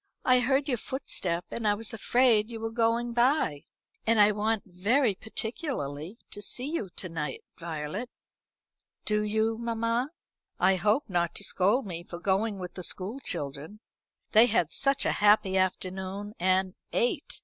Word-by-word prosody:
I 255 Hz, 0 st, +6 dB
heard 265 Hz, +3 st, +2 dB
your 250 Hz, -5 st, 0 dB
footstep, 180 Hz, -11 st, -2 dB
and 225 Hz, -2 st, -2 dB
I 205 Hz, -, +4 dB
was 225 Hz, +2 st, -3 dB
afraid 225 Hz, -1 st, +3 dB
you 230 Hz, -1 st, -6 dB
were 225 Hz, 0 st, -3 dB
going 230 Hz, +1 st, +1 dB
by. 240 Hz, -, +2 dB, 0.4 s
And 225 Hz, -1 st, +4 dB
I 210 Hz, 0 st, +7 dB
want 215 Hz, +1 st, 0 dB
very 205 Hz, +7 st, +2 dB
particularly 220 Hz, -, -4 dB
to 205 Hz, -, -7 dB
see 245 Hz, +5 st, 0 dB
you 225 Hz, -, -2 dB
to 185 Hz, -, -5 dB
night, 160 Hz, -3 st, -4 dB, 0.2 s
Violet." 165 Hz, +8 st, -4 dB, 1.0 s
"Do 210 Hz, 0 st, +1 dB
you, 220 Hz, +1 st, 0 dB
mamma? 230 Hz, +2 st, 0 dB, 0.5 s
I 190 Hz, +1 st, +4 dB
hope 210 Hz, +9 st, +2 dB
not 175 Hz, -3 st, 0 dB
to -, -, -3 dB
scold 205 Hz, +8 st, +2 dB
me 175 Hz, -3 st, -5 dB
for 175 Hz, -, -8 dB
going 200 Hz, +4 st, 0 dB
with 180 Hz, -2 st, -6 dB
the 180 Hz, -, -7 dB
school 195 Hz, +9 st, -4 dB
children. 145 Hz, -, -5 dB, 0.5 s
They 225 Hz, +2 st, +7 dB
had 175 Hz, -9 st, +1 dB
such 275 Hz, 0 st, +2 dB
a -, -, +3 dB
happy 205 Hz, -2 st, +5 dB
afternoon; 190 Hz, +2 st, -2 dB
and 185 Hz, +1 st, +2 dB, 0.2 s
ate! 245 Hz, +5 st, -1 dB
210 Hz, 160 wpm, -28 LUFS, 185-235 Hz, 1.0 s, I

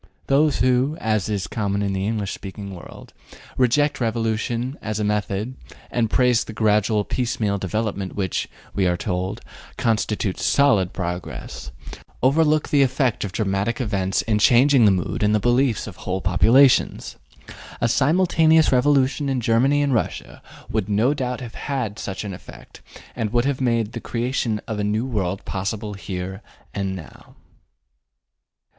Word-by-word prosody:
Those 145 Hz, +1 st, +2 dB
who 130 Hz, +4 st, +2 dB
(as 110 Hz, -2 st, 0 dB
is 100 Hz, -2 st, -1 dB
common 100 Hz, -2 st, -2 dB
in 100 Hz, -1 st, -1 dB
the 95 Hz, +1 st, -1 dB
English 105 Hz, -3 st, -2 dB
speaking 100 Hz, 0 st, -8 dB
world) 85 Hz, -, -12 dB, 0.4 s
reject 135 Hz, +3 st, +2 dB
revolution 115 Hz, +2 st, -1 dB
as 110 Hz, 0 st, -3 dB
a -, -, 0 dB
method, 105 Hz, +2 st, -1 dB, 0.4 s
and 115 Hz, -2 st, 0 dB
praise 125 Hz, -1 st, +3 dB
the 110 Hz, -, -9 dB
gradual 105 Hz, -1 st, +2 dB
piecemeal 115 Hz, -5 st, -1 dB
development 100 Hz, 0 st, -3 dB
which 95 Hz, -4 st, -2 dB, 0.2 s
(we 95 Hz, -2 st, +1 dB
are 90 Hz, 0 st, +1 dB
told) 95 Hz, +4 st, -3 dB, 0.4 s
constitutes 110 Hz, -4 st, -1 dB
solid 105 Hz, -11 st, +3 dB
progress, 90 Hz, -8 st, -5 dB, 0.5 s
overlook 155 Hz, +3 st, +3 dB
the 145 Hz, -, +4 dB
effect 130 Hz, -2 st, +1 dB
of 100 Hz, -, -4 dB
dramatic 100 Hz, +3 st, -1 dB
events 100 Hz, -6 st, 0 dB
in 105 Hz, -2 st, 0 dB
changing 125 Hz, +2 st, +5 dB
the -, -, +7 dB
mood 90 Hz, -2 st, -2 dB
and 105 Hz, 0 st, +3 dB
the -, -, +3 dB
beliefs 120 Hz, +1 st, +1 dB
of 100 Hz, -4 st, -9 dB
whole 95 Hz, +1 st, -3 dB
populations. 115 Hz, +9 st, +3 dB, 0.6 s
A 120 Hz, -, +2 dB
simultaneous 160 Hz, +4 st, +3 dB
revolution 135 Hz, +2 st, +2 dB
in 135 Hz, -1 st, 0 dB
Germany 130 Hz, +5 st, +2 dB
and 140 Hz, -2 st, +1 dB
Russia 115 Hz, -, -3 dB, 0.3 s
would 105 Hz, -2 st, -1 dB
no 110 Hz, +7 st, +2 dB
doubt 125 Hz, -3 st, -3 dB
have 120 Hz, -2 st, -8 dB
had 125 Hz, -7 st, -4 dB
such 95 Hz, +1 st, -5 dB
an 100 Hz, -2 st, -5 dB
effect, 90 Hz, -, -13 dB, 0.3 s
and 110 Hz, -4 st, -2 dB
would 120 Hz, +1 st, +2 dB
have 140 Hz, -1 st, -1 dB
made 115 Hz, -3 st, +1 dB
the -, -, -6 dB
creation 120 Hz, -2 st, -2 dB
of 110 Hz, -2 st, -3 dB
a -, -, 0 dB
new 105 Hz, +3 st, 0 dB
world 100 Hz, -7 st, -2 dB
possible 105 Hz, +2 st, -3 dB
here 95 Hz, 0 st, -6 dB, 0.3 s
and 95 Hz, -2 st, -2 dB
now. 80 Hz, -5 st, -12 dB
110 Hz, 150 wpm, -22 LUFS, 100-130 Hz, 0.6 s, the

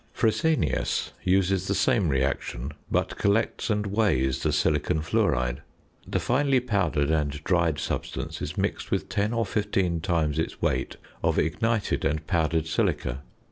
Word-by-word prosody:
Fresenius 115 Hz, -, +1 dB
uses 95 Hz, 0 st, +2 dB
the 100 Hz, -, +1 dB
same 110 Hz, -9 st, +2 dB
reaction; 65 Hz, -1 st, -1 dB, 0.2 s
but -, -, 0 dB
collects 105 Hz, +4 st, +1 dB
and 105 Hz, -1 st, +1 dB
weighs 80 Hz, -, +1 dB
the 80 Hz, -, +1 dB
silicon 75 Hz, 0 st, +1 dB
fluoride. 60 Hz, -5 st, +1 dB, 0.5 s
The -, -, 0 dB
finely 135 Hz, +1 st, +2 dB
powdered 90 Hz, -, 0 dB
and 75 Hz, -2 st, +1 dB
dried 85 Hz, -4 st, +2 dB
substance -, -, -4 dB
is -, -, -4 dB
mixed -, -, -2 dB
with -, -, -1 dB
ten 105 Hz, +2 st, 0 dB
or 115 Hz, -1 st, 0 dB
fifteen 95 Hz, -4 st, 0 dB
times 80 Hz, -4 st, 0 dB
its 80 Hz, -, -3 dB
weight 65 Hz, +1 st, -1 dB, 0.3 s
of -, -, +1 dB
ignited 110 Hz, +7 st, 0 dB
and 75 Hz, +1 st, 0 dB
powdered 80 Hz, -2 st, +1 dB
silica. 70 Hz, -4 st, -1 dB
85 Hz, 140 wpm, -26 LUFS, 75-105 Hz, 0.5 s, uses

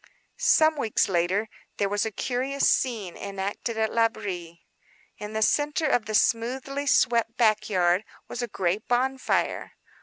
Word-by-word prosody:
Some 315 Hz, 0 st, +4 dB
weeks 225 Hz, -6 st, +1 dB
later 190 Hz, +3 st, 0 dB, 0.3 s
there 200 Hz, -, +1 dB
was 205 Hz, +2 st, 0 dB
a -, -, -4 dB
curious 260 Hz, +5 st, -1 dB
scene 220 Hz, -9 st, 0 dB
enacted 200 Hz, +3 st, -4 dB
at 220 Hz, -1 st, 0 dB
L'Abri. 190 Hz, -7 st, -2 dB, 0.5 s
In 210 Hz, +1 st, -7 dB
the 220 Hz, 0 st, +1 dB
centre 295 Hz, +6 st, +1 dB
of 245 Hz, -7 st, +1 dB
the 215 Hz, -, -2 dB
smoothly 265 Hz, +6 st, 0 dB
swept 235 Hz, -3 st, +2 dB
back 215 Hz, -2 st, +2 dB
yard 180 Hz, 0 st, +2 dB, 0.2 s
was 245 Hz, -, -5 dB
a 240 Hz, -, -2 dB
great 195 Hz, 0 st, -2 dB
bonfire. 260 Hz, +2 st, 0 dB
220 Hz, 145 wpm, -26 LUFS, 200-250 Hz, 0.5 s, Some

